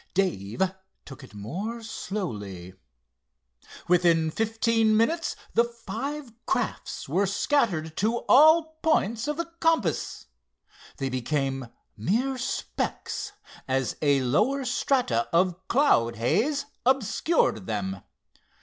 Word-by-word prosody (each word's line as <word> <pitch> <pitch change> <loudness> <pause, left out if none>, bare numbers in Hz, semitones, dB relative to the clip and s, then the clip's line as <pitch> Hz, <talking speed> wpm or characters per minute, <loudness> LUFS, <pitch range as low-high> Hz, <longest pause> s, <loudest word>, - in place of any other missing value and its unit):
Dave 175 - 0 0.4
took 135 0 -11
it 125 - -14
more 195 - -5
slowly. 105 - -5 1.1
Within 170 -2 +3
fifteen 225 +1 +2
minutes 325 +10 +1 0.2
the 235 - +5
five 235 +4 -6
crafts 245 - -2
were 185 +8 +1
scattered 190 - 0
to 225 +4 +1
all 315 +2 +6
points 235 -6 +1
of 300 0 -2
the 335 - -1
compass. 325 - 0 0.7
They 135 - -2
became 135 0 -2 0.3
mere 240 - 0
specks 270 +9 -3 0.3
as 130 -1 0
a 140 -3 +3
lower 235 - +1
strata 240 - +1
of 180 +2 +1
cloud 120 - +3
haze 225 - +1 0.2
obscured 250 - +1
them. 95 -3 -3
200 Hz, 105 wpm, -26 LUFS, -, 1.1 s, all